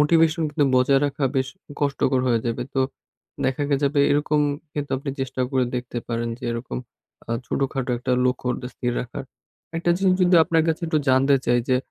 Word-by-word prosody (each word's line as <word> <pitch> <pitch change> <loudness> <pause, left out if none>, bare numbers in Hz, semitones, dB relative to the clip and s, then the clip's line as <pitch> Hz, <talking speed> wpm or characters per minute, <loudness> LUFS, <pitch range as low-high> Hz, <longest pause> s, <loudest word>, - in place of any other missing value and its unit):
Motivation 160 +2 +4
কিন্তু 145 -1 +2
বজায় 135 +2 +4
রাখা 140 0 -2
বেশ 130 0 +1 0.3
কষ্টকর 140 -2 +1
হইয়া 120 -2 +2
যাবে। 120 +1 -1
তো 135 - +2 0.6
দেখা 130 +2 0 0.2
যাবে 140 +1 +2
এরকম 150 +1 +2 0.3
কিন্তু 145 -2 -4
আপনি 140 +1 -4
চেষ্টা 130 0 -3
করে 130 -2 +2
দেখতে 120 -1 -3
পারেন 115 0 -1
যে, 130 - -9
এরকম 115 +2 -4 0.5
আ - - -5 0.2
ছোটখাটো 135 -2 -1
একটা 125 +1 -1
লক্ষ্য 125 0 0 0.3
স্থির 120 -1 -2
রাখার। 125 +2 -6 0.5
একটা 170 +1 +1
জিনিস 190 -1 +3
যদি 180 0 +4
আপনার 165 0 +2
কাছে 160 +1 -1
একটু 155 -1 +1
জানতে 130 +2 +4
চাই 120 +1 +4
যে, 130 - +4
135 Hz, 175 wpm, -23 LUFS, 125-150 Hz, 0.6 s, Motivation